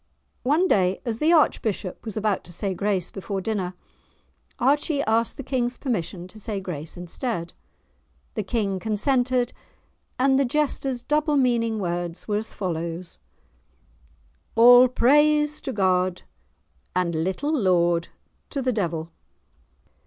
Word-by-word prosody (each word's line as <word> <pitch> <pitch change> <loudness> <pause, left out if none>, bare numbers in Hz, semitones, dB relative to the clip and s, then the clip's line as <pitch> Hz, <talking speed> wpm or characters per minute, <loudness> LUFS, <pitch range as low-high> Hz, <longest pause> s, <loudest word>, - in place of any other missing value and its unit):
One 310 +8 +2
day, 185 - +2
as 230 -2 -2
the 315 +2 +3
archbishop 220 - +1
was 220 -1 -5
about 215 -2 0
to - - -10
say 190 +3 -2
grace 190 -2 -1
before 195 0 -4
dinner, 190 -3 -2 0.8
Archie 285 +3 +2
asked 225 +2 +1
the 275 - -5
King's 250 -1 -1
permission 185 - -3
to 215 - -12
say 210 -1 -3
grace 165 -5 -7
instead. 175 0 -4 0.8
The 215 - -2
King 200 -2 -1
consented, 245 +4 0 0.6
and 265 +1 +3
the - - +4
jester's 270 -2 -1
double 300 +1 +1
meaning 235 -4 +2
words 175 -3 -3
were 205 -1 +1
as 220 +2 -5
follows:— 170 -1 -4 1.4
"All 245 +2 +8
praise 295 +4 +3
to 265 - -4
God, 185 -4 +1 0.7
and 180 -2 +1
little 275 - -1
laud 175 - +2 0.4
to 275 -3 -3
the 255 0 +1
devil!" 170 -5 -2
220 Hz, 130 wpm, -24 LUFS, 185-255 Hz, 1.4 s, All